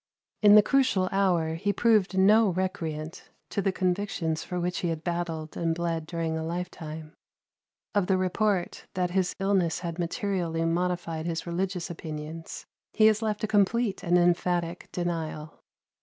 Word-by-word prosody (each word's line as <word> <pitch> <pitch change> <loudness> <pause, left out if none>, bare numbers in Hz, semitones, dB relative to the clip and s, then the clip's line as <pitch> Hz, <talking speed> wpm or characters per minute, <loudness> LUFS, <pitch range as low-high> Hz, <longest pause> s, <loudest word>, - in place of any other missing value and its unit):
In 210 -1 +8
the 210 - +8
crucial 255 -8 +2
hour 180 -5 +2
he 200 +5 0
proved 205 -3 +2
no 210 +3 +6
recreant 165 -4 -4 0.2
to 200 - 0
the 195 - +1
convictions 180 -4 -1
for 180 - -4
which 175 +1 -1
he 175 - -1
had 165 -1 -3
battled 170 -3 -3
and 165 -1 0
bled 165 -2 -2
during 165 -1 -2
a 160 - -3
lifetime. 160 -2 -6 0.8
Of 200 -3 +1
the 190 - +3
report 185 0 0
that 180 -1 0
his 185 -1 0
illness 195 -4 +1
had 170 -1 -5
materially 175 -2 -1
modified 170 -1 -1
his 165 -1 -3
religious 180 0 -2
opinions, 160 0 -7 0.3
he 215 - +4
has 215 0 +4
left 215 -1 -2
a - - +1
complete 210 +1 +2
and 175 +1 +3
emphatic 175 0 +1
denial. 160 -3 -4
175 Hz, 155 wpm, -27 LUFS, 165-195 Hz, 0.8 s, In